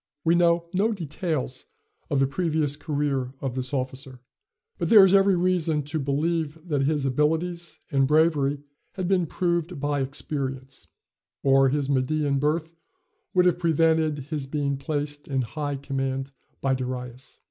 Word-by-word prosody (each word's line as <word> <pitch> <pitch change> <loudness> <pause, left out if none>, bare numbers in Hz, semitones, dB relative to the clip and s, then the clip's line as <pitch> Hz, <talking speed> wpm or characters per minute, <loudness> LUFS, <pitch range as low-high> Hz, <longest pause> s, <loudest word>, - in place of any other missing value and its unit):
We 165 - +3
know 170 -1 +3
no 210 +5 +2
details 160 -7 -3 0.4
of 140 - +1
the 135 - +4
previous 155 -1 -1
career 145 -4 -2
of 135 -3 -3
this 130 0 -2
officer; 130 -1 -4 0.6
but - - -1
there 210 -4 +9
is 190 - +3
every 195 -1 +5
reason 170 -4 +1
to 145 +3 -3
believe 155 +3 -1
that 145 -4 0
his 145 -1 0
abilities 160 +5 -1
and 135 -1 +3
bravery 145 -2 +2 0.3
had 185 -2 -3
been 180 -3 +2
proved 170 -1 -1
by 145 0 0
experience, 135 -1 -4 0.6
or 135 0 +5
his 140 0 0
Median 140 +1 +1
birth 155 +3 0 0.6
would 180 -1 +5
have 180 -1 +3
prevented 160 -2 +2
his 145 -3 -3
being 140 0 -1
placed 145 0 -4
in 135 -2 0
high 145 +4 -3
command 135 -1 -3 0.3
by 135 -1 +2
Darius. 125 0 -5
145 Hz, 145 wpm, -25 LUFS, 135-165 Hz, 0.6 s, there